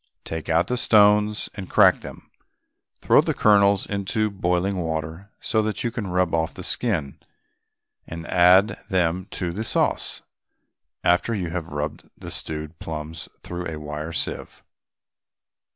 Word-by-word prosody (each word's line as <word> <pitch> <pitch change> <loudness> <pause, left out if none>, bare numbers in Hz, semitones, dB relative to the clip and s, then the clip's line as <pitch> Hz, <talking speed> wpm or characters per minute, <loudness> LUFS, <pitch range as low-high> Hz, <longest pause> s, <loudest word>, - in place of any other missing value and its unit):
Take 80 0 -5
out 85 +2 +3
the 125 +6 -2
stones 105 -2 +4
and 95 -3 -8
crack - - +5
them. - - -11 0.7
Throw - - +6
the - - -2
kernels 100 -2 +4
into 100 +2 -1
boiling 95 0 0
water 80 +3 -4
so 110 - +1
that 110 -2 -2
you 120 - -1
can 115 -4 -4
rub 90 -2 0
off 80 -1 0
the - - -8
skin, 85 - -1 0.9
and 85 0 -7
add 95 +5 +4
them 90 -1 0
to 90 -2 -2
the 105 +6 -4
sauce - - -1 0.8
after 90 +6 +2
you 90 -5 -3
have 85 -2 -4
rubbed 75 0 -5
the - - -9
stewed 75 +1 -5
plums 80 0 -6
through 90 0 -5
a 80 - -5
wire 75 +2 -5
sieve. - - -4
90 Hz, 145 wpm, -24 LUFS, 80-100 Hz, 0.9 s, Throw